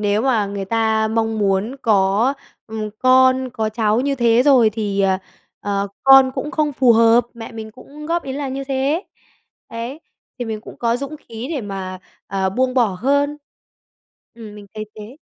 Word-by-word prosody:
nếu 205 +1 +1
mà 230 -6 +2
người 200 -1 -4
ta 220 +1 +1
mong 225 0 -1
muốn 200 +5 0
có, 215 +4 +2 0.3
ừm, 215 -1 -5
con, 260 0 +4
có 220 -3 -1
cháu 220 0 +1
như 280 +1 0
thế 235 -2 +3
rồi 255 -6 +5
thì, 205 -2 -2
ờ, 190 -1 +2 0.4
ờ, 200 0 -2 0.2
con 270 -1 +8
cũng 295 - -3
không 305 -3 0
phù 255 -2 +4
hợp, 230 +1 +5
mẹ 230 0 -9
mình 220 -1 -8
cũng 295 +6 -12
góp 340 +1 0
ý 265 - -5
là 280 0 -3
như 275 +1 -4
thế. 275 +5 0 0.7
Đấy, 235 +6 -6 0.4
thì 245 - -3
mình 220 -2 -4
cũng - - -12
có 235 0 +1
dũng 280 +3 -6
khí 235 -2 -8
để 295 -6 -2
mà, 190 -3 -6 0.3
à, 190 -1 -1
buông 255 +6 0
bỏ 245 -3 +4
hơn. 285 +3 +1 1.0
Ừm, 220 -3 -10
mình 205 -1 -12
thấy 215 0 -5
thế. 215 +5 -10
230 Hz, 185 wpm, -20 LUFS, 215-265 Hz, 1.0 s, con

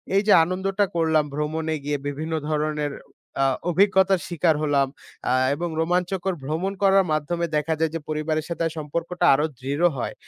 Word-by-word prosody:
এই 200 - +5
যে - - +7
আনন্দটা 190 +3 0
করলাম 160 -2 +2
ভ্রমণে 155 +2 -2
গিয়ে, 145 0 -1
বিভিন্ন 155 +3 -4 0.2
ধরনের 150 -1 -1 0.5
আ - - +4 0.2
অভিজ্ঞতার 190 +1 +3
শিকার 165 -2 +2
হলাম। 140 -2 +2 0.4
আ - - +3 0.2
এবং 170 +2 -3
রোমাঞ্চকর 180 +2 0
ভ্রমণ 165 +7 -2
করার 195 -1 +5
মাধ্যমে 170 +3 -1
দেখা 155 +2 0
যায় 160 -1 +1
যে, - - -1
পরিবারের 155 0 -1
সাথে 170 0 -2
সম্পর্কটা 170 +4 -2
আরো 150 +3 +2
দৃঢ় 140 +7 +1
হয়। - - -3
160 Hz, 160 wpm, -24 LUFS, 150-180 Hz, 0.5 s, যে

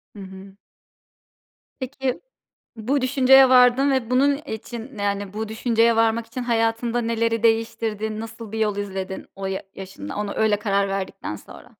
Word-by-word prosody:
Hı - - -10
hı. 190 +1 -12 1.2
Peki, 260 -1 -3 0.5
bu 250 +5 -1
düşünceye 265 0 +6
vardın 255 +2 +5
ve 255 -3 0
bunun 275 +2 +3
için, 235 -3 -8
yani 200 -1 -2
bu 220 0 -4
düşünceye 230 0 +2
varmak 225 0 +2
için, 245 +2 -5
hayatında 230 0 0
neleri 230 0 0
değiştirdin? 220 -1 0
Nasıl 225 -1 -8
bir 220 - -4
yol 210 -2 0
izledin 190 -1 -5
o 195 0 -6
ya 190 0 -3
yaşında? 195 0 -8
Ona, 205 -1 -3
öyle 210 -2 +2
karar 200 -1 +1
verdikten 195 - -4
sonra. - - -13
225 Hz, 145 wpm, -23 LUFS, 205-245 Hz, 1.2 s, düşünceye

